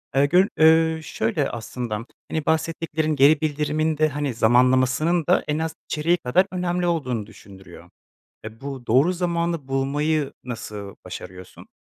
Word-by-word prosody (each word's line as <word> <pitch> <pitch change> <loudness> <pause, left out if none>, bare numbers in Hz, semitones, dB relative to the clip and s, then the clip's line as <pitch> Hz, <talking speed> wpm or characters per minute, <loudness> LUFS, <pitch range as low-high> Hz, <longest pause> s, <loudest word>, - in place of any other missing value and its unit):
Eee, 140 - +5
göl 180 +6 +4
eee, 160 0 +4
şöyle 135 +3 -1
aslında, 115 -1 -5 0.2
hani 155 -2 -3
bahsettiklerin 160 -1 -1
geri 145 +2 +5
bildirimin 155 +1 0
de 155 0 +3
hani, 145 -2 -3
zamanlamasının 130 +8 +3
da - - +3
en 150 +1 -1
az 160 0 -3
içeriği 165 +3 +1
kadar 175 +7 +2
önemli 180 -1 -1
olduğunu 130 -10 -1
düşündürüyor. 95 -3 -14 0.6
E, 110 +1 -10
bu 135 -3 -7
doğru 135 +10 +4
zamanı 170 -4 -2
bulmayı 145 +2 0
nasıl 105 -5 -7
başarıyorsun? 90 0 -10
150 Hz, 135 wpm, -23 LUFS, 125-160 Hz, 0.6 s, Eee